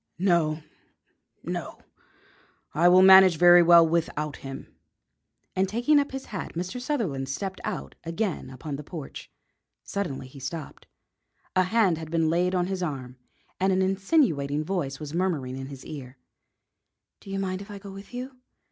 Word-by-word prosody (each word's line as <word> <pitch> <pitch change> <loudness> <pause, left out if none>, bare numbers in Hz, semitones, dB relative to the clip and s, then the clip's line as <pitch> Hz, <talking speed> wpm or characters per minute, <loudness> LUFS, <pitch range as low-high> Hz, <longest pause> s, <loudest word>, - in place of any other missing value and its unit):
"No, 165 -4 +1 0.8
no; - - -5 1.0
I 170 +4 +4
will 185 +1 +7
manage 190 -2 +8
very 175 +1 +8
well 170 -1 +7
without 155 -3 -1
him." 135 0 -9 0.8
And 190 0 +1
taking 245 +8 +3
up 280 - -1
his 270 0 -6
hat 185 - -5
Mr. 185 +9 -4
Sutherland 190 - -2
stepped 190 +7 -4
out - - -4
again 170 -1 -3
upon 140 +2 -6
the 150 - -8
porch. 150 -2 -8 0.5
Suddenly 160 -10 -4
he 135 +2 -13
stopped. 145 +3 -7 0.7
A 185 0 +4
hand 190 -4 +2
had 160 -1 -7
been 165 -1 +1
laid 180 +2 +1
on 180 -1 +1
his 190 0 -3
arm 130 -7 -4 0.4
and 190 +1 +2
an 190 0 +2
insinuating 185 - +1
voice 155 -6 -3
was 150 -1 -7
murmuring 165 -8 -1
in 135 0 -6
his 135 -2 -10
ear: 130 -3 -9 1.0
"Do - - -14
you 195 - -3
mind 190 -1 -2
if 200 - -11
I 205 - -7
go 200 0 -10
with 195 +1 -11
you? 255 +1 -7
175 Hz, 160 wpm, -26 LUFS, 150-195 Hz, 1.0 s, manage